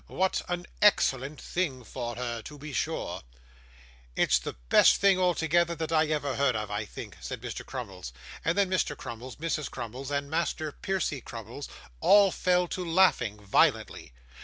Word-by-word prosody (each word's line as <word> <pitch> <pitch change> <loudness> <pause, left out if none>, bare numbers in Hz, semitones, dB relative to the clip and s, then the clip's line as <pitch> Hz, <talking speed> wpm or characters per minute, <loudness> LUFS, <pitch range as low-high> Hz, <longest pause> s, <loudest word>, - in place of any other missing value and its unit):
'What 190 0 0
an 175 0 -2 0.2
excellent 140 -8 +3
thing 145 -9 -2
for 120 0 -5
her, 120 -1 -3
to 150 +6 -10
be 145 0 -8
sure!' - - -2 0.9
'It's - - +3
the - - -6
best - - +7
thing 195 -2 +4
altogether, 170 -1 +2
that 160 -1 -4
I 160 -1 +3
ever 150 -3 -1
heard 140 -4 +2
of, 105 -1 -3
I 105 +1 -2
think,' - - -9
said - - -5
Mr - - -6
Crummles; 60 - -7 0.3
and 165 +3 +1
then 200 -1 +4
Mr. 185 0 0
Crummles, 120 +2 -8
Mrs. 155 -2 -2
Crummles, 125 +2 -6
and 140 0 -1
Master 155 0 -1
Percy 175 -6 -2
Crummles, 115 +5 -8 0.3
all 200 - +6
fell 180 0 +2
to 185 - -3
laughing 165 - +2
violently. 95 - +2
150 Hz, 160 wpm, -28 LUFS, 125-175 Hz, 0.9 s, best